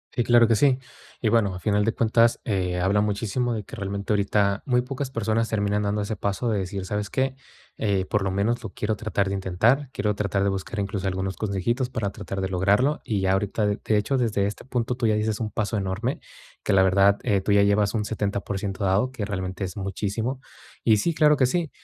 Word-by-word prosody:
Sí, 120 - +2
claro 120 -1 +5
que 115 - +3
sí, 135 +2 +3 0.4
y 115 - +1
bueno, 105 -4 +2
a 90 - -6
final 105 +1 +1
de 115 - +2
cuentas, 115 +1 +3
eh, 90 -4 -1
habla 100 +3 +2
muchísimo 110 +4 -1
de 110 - -3
que - - -10
realmente 100 0 -3
ahorita 100 0 +1
muy 125 -2 +2
pocas 135 +1 -5
personas 115 -1 0
terminan 105 -1 0
dando 105 +1 0
ese 105 +1 -3
paso 100 +5 -2
de 105 -3 +1
decir: 95 0 -4
"¿Sabes 105 0 -3
qué? 130 +3 0 0.4
Eh, 100 -3 0
por 105 0 0
lo 95 - -1
menos 105 +5 0
lo - - -5
quiero 110 0 -1
tratar 100 -2 -1
de 100 - -1
intentar, 110 +9 +1
quiero 105 -5 -1
tratar 100 -1 0
de 100 - +2
buscar, 95 +3 -4
incluso, 100 -1 -2
algunos 95 0 -2
consejitos 110 +5 -1
para 110 -5 -2
tratar 95 -1 -6
de 95 - 0
lograrlo", 100 +10 +2
y 105 -3 -1
ya 95 0 +2
ahorita, 105 +2 0
de 100 - -1
de 110 - +2
hecho, 120 +6 0
desde 110 -5 +1
este 105 - -6
punto 125 -2 -1
tú 120 -2 -2
ya 110 - +3
diste 105 0 -1
un 110 -1 -2
paso 110 +1 -2
enorme, 100 +7 -2 0.4
que - - 0
la 95 -1 +6
verdad, 100 +1 +4
eh, 100 -2 +2
tú 100 - -1
ya 100 0 +5
llevas 100 +1 +2
un 105 -2 -1
70% 100 -2 -2
dado, 100 +7 +2
que 110 -6 -4
realmente 95 -1 -4
es 90 - -7
muchísimo, 105 +6 -3 0.5
y 110 -2 +5
sí, 165 +11 0
claro 150 -2 +5
que 130 - +4
sí, 165 +4 0
105 Hz, 225 wpm, -25 LUFS, 100-115 Hz, 0.5 s, la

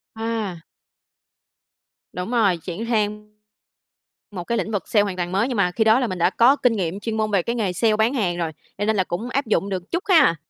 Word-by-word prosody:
À. 220 -5 -3 1.5
Đúng 180 +6 -5
rồi, 205 -8 +3
chuyển 180 +6 -6
sang 210 -1 -1 1.0
một 180 -4 -6
cái 235 +4 -1
lĩnh - - -2
vực 205 - -3
sale 210 - +4
hoàn 200 -3 -3
toàn 175 -1 -3
mới, 200 +6 +1
nhưng 250 - -3
mà 190 -3 +2
khi 220 +5 0
đó 220 +2 +5
là 250 - +1
mình 185 -5 -4
đã 175 +2 +3
có 245 +7 +4
kinh 250 -4 +2
nghiệm, 185 0 -2
chuyên 220 +1 -3
môn 215 -1 0
về 195 -3 +2
cái 235 - -2
nghề 205 -6 0
sale 215 +4 +2
bán 220 +5 +2
hàng 190 -9 0
rồi, 165 -2 -2 0.3
cho 205 - -1
nên 220 +1 +1
là 190 - +2
cũng 200 +8 -4
áp 275 +1 -1
dụng 205 -2 0
được 185 -1 -5
chút 345 - -1
ha. 315 - +5
210 Hz, 235 wpm, -22 LUFS, 185-230 Hz, 1.5 s, đó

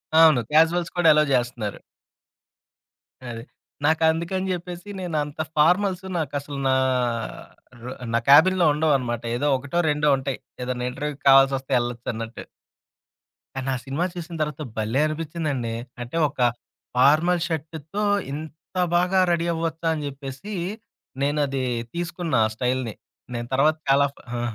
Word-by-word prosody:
అవును. 160 -5 +7
క్యాజువల్స్ 165 +3 +3
కూడా 175 -2 +4
ఎలో 150 0 +4
జేస్తున్నారు. 120 -4 -1 1.5
అది. 115 -1 -6 0.4
నాకందుకని 165 +4 +1
జెప్పేసి 180 +2 -6
నేనంత 155 -4 -3 0.2
ఫార్మల్సు 185 +4 +2
నాకసలు 145 -2 -3
నా 130 - +3 1.1
రో 125 - -6 0.2
నా 115 - +3
క్యాబిన్‌లో 175 +5 +7
ఉండవనమాట. 135 -6 +1
ఏదో 145 +4 0
ఒకటో, 145 +6 -2
రెండో 150 0 +1
ఉంటాయి. 135 0 -4 0.2
ఏదన్నా 125 0 -3
ఇంటర్వ్యూకి 150 +2 -5
కావాల్సొస్తే 135 0 +5
ఎళ్ళొచ్చన్నట్టు. 115 -1 -5 1.1
కానా 135 0 -2
సినిమా 145 +6 -1
చూసిన 170 -1 -6
తర్వాత 150 0 -2 0.2
భలే 110 +6 +1
అనిపిచ్చిందండి. 155 -6 -3 0.3
అంటే, 120 +7 -5
ఒక 140 - -17 0.6
ఫార్మల్ 155 +7 +4
షర్టుతో 160 +4 -4 0.3
ఇంత 155 +3 -9 0.2
బాగా 180 +2 +3
రెడీ 170 0 +1
అవ్వొచ్చా? 165 0 -2
అని 150 - -4
జెప్పేసి 140 +8 -7 0.7
నేనది 140 -2 0 0.3
తీసుకున్నా 170 -5 -1
ఆ - - -6
స్టైల్‌ని. 125 -2 -1 0.4
నేను 120 0 -4
తర్వాత 150 +4 +3
చాలా 140 +1 +5
ఫా - - -17 0.2
ఆ! - - -2
150 Hz, 120 wpm, -24 LUFS, 130-165 Hz, 1.5 s, అవును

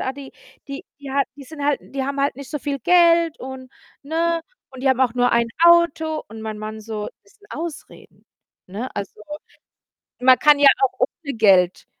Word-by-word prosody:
Ah, 260 - -2
die 275 0 -11 0.4
die 275 0 -6 0.2
die 280 -1 -8
hat 280 0 +1
die 285 - -11
sind 290 +2 -9
halt 290 0 +2
die 275 -1 -5
haben 280 +1 -4
halt 280 -2 0
nicht 280 -1 -9
so 295 - -3
viel 280 0 -3
Geld 335 +2 +4
und, 260 0 -9 0.3
ne, 330 +3 0 0.3
und 260 -1 -11
die 270 - +2
haben 260 -1 +2
auch 255 -3 +3
nur 245 0 +2
1 235 0 +2 0.2
Auto 330 -2 +4
und 220 +1 -10
mein 220 -1 -5
Mann 215 +1 -7
so: 215 -1 -5 0.2
„Das 200 - -24
sind 415 - -23
Ausreden, 325 0 -9 0.4
ne?“ 210 +7 -5
Also, 200 +1 -6 1.0
man 255 0 +6
kann 295 +1 +5
ja 280 - +8
auch 265 - +3
ohne 280 -5 -2
Geld, 190 -5 +3
275 Hz, 195 wpm, -21 LUFS, 235-300 Hz, 1.0 s, ja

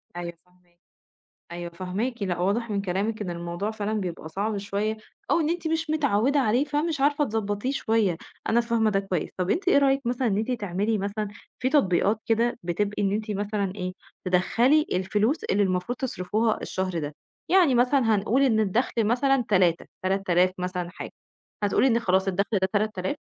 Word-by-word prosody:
أيوه 175 -1 -5
فاهماكِ. 180 -1 -32 0.7
أيوه 175 0 -5
فاهماكِ، 195 +8 -3
لأ 180 -3 -1
واضح 210 +6 0
من 200 -1 0
كلامِك 200 +4 -2
إن 195 - -3
الموضوع 175 +4 -3
فعلًا 215 -1 -3
بيبقى 180 -6 -4
صعب 205 +5 -2
شوية 205 +2 -2 0.3
أو 340 - +4
إن 310 -2 +1
أنتِ 340 -1 -2
مش 320 0 -1
متعوّدة 280 -3 +2
عليه، 250 +2 +2
فمش 295 0 -1
عارفة 290 +1 +3
تضبطيه 215 0 -2
شوية، 220 -9 +1 0.3
أنا 235 +1 +4
فاهمة 230 -2 +1
ده 195 -2 +1
كويس. 190 -4 -2
طَب 180 0 -1
أنتِ 360 - 0
إيه 365 - +6
رأيِك 275 -1 +3
مثلًا 245 +1 0
إن 200 -3 +1
أنتِ 220 +4 -1
تعملي 210 -1 -1
مثلًا 205 +2 -2 0.3
في 255 - +1
تطبيقات 210 - +2
كده 230 +1 +1
بتبقى 200 +5 -1
إن 195 - +1
أنتِ 215 +1 -2
مثلًا 205 -1 -2
إيه، 185 -2 -4 0.3
تدخّلي 235 +11 +3
الفلوس 205 - 0
اللي 205 +1 +2
المفروض 185 +6 -1
تصرفوها 220 -3 -1
الشهر 185 -2 -2
ده، 145 -1 -5 0.3
يعني 350 -8 +5
مثلًا 245 -2 +3
هنقول 215 +6 +1
إن 230 -5 +3
الدَخل 220 +3 +1
مثلًا 265 +3 +2
3، 180 -4 +3 0.2
3000 185 -1 +2
مثلًا 180 -1 -3
حاجة، 175 - -8 0.5
هتقول 205 - +2
لي 265 - +5
إن 230 -1 +3
خلاص 190 -3 +1
الدَخل 200 +3 0
ده 190 - +1
3000 205 -3 -1
210 Hz, 180 wpm, -26 LUFS, 185-245 Hz, 0.7 s, إيه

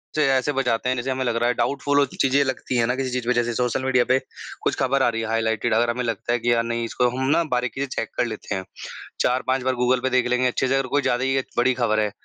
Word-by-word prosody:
से 155 - +3
ऐसे 130 +2 +1
बचाते 125 -2 0
हैं, 130 - +1
जैसे 130 +2 -2
हमें 130 0 -1
लग 120 -1 0
रहा 120 +1 +1
है - - +2
डाउटफुल 140 +1 0
वो 140 - +4
चीज़ें 135 +2 +1
लगती 130 -1 -2
हैं 115 -1 +2
ना 125 - 0
किसी 130 0 -2
चीज़ 125 -2 -3
पे 125 - +3
जैसे 120 0 0
सोशल 125 +1 0
मीडिया 125 -2 +3
पे 130 +1 +4 0.4
कुछ - - +1
खबर 135 0 +2
आ - - +4
रही 115 -1 -3
है 115 - -3
हाइलाइटेड। 110 0 0
अगर 120 +1 +2
हमें 125 +1 -3
लगता 115 +1 -2
है 120 - +1
कि 120 +1 +1
यार 115 - +2
नहीं 115 0 -2
इसको 125 +2 +1
हम 130 - -1
ना 170 +3 +3
बारीकी 125 +1 -2
से 140 - -1
चेक 115 - -2
कर - - +2
लेते 110 -2 -5
हैं 95 - -4 0.6
4-5 130 +1 +1
बार 130 0 0
गूगल 125 +1 +2
पे 130 - +1
देख 125 -1 +2
लेंगे 125 +1 +1
अच्छे 130 +1 -1
से 135 - +1
अगर 135 -1 0
कोई 145 +2 +1
ज़्यादा 130 -1 0
ही 135 0 +1
अ, 135 - 0 0.2
बड़ी 125 +1 +3
खबर 110 -3 +1
है 105 -1 0
125 Hz, 295 wpm, -23 LUFS, 120-130 Hz, 0.6 s, वो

